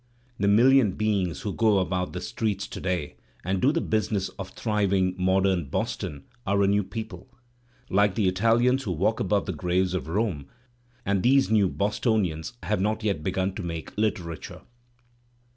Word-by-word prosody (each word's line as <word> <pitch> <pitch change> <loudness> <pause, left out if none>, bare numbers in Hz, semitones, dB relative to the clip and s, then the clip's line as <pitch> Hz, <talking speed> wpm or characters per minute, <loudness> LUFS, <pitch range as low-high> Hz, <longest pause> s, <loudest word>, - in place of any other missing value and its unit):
The 100 - +1
million 115 0 +5
beings 100 -5 -1
who 100 - -3
go 110 -3 +3
about 90 -1 -1
the 90 - -4
streets 100 0 -2
to - - -8
day 90 -5 -2 0.3
and 95 0 0
do 135 - +4
the 165 +1 0
business 105 -3 -1
of 95 - -5
thriving 100 -4 0
modem 95 -2 +2
Boston 70 +1 -3 0.2
are 100 +1 +3
a - - +3
new 100 +1 +2
people, 110 -1 -7 0.6
like 100 0 +2
the 105 -4 +2
Italians 115 +7 +3
who 100 -8 -3
walk 100 +7 0
above 100 +1 +1
the 95 - -3
graves 90 +2 0
of 90 - -3
Rome; 85 -6 -1 0.6
and 100 -1 +1
these 135 +1 +3
new 105 -4 +4
Boston 105 +2 +1
ians 80 +4 -4
have 105 -2 0
not 110 +2 -1
yet 100 -8 0
begun 95 +2 -1
to 100 - -5
make 85 -3 -6
Uterature. 100 -7 -3
100 Hz, 170 wpm, -26 LUFS, 90-110 Hz, 0.6 s, million